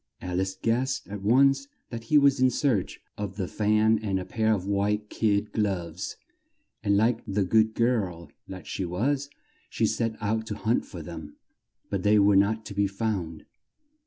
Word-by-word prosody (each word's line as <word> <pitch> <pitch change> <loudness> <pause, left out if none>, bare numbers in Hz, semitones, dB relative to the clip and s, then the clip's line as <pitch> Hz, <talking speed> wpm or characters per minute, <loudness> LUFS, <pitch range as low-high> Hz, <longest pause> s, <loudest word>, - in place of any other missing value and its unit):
Al 90 0 -2
ice 95 0 -3
guessed 125 +6 -1
at 100 -1 -6
once 135 +6 +4 0.2
that 115 -1 -6
he 150 - +4
was 140 -1 +4
in 130 0 +5
search 120 -7 0 0.2
of 100 -2 -4
the 95 -3 -2
fan 110 +2 +2
and 100 -3 -1
the 90 - -4
pair 110 +2 0
of 100 -4 0
white 105 +1 -1
kid 105 -1 0
gloves, 90 -5 -2 0.6
and 100 -2 +2
like 115 +2 +2
the 100 0 0
good 110 +3 +2
girl 95 -10 0 0.2
that 95 -2 -9
she 95 - -4
was, 135 +11 -1 0.4
she 115 - 0
set 110 +1 -1
out 110 +1 -1
to 105 - -4
hunt 115 +4 0
for 85 -5 -8
them, 80 -3 -9 0.6
but 100 -2 -1
they 105 +2 +4
were 100 0 +5
not 105 +3 +2
to - - -7
be 100 0 +1
found. 95 -6 -3
105 Hz, 180 wpm, -27 LUFS, 95-115 Hz, 0.6 s, in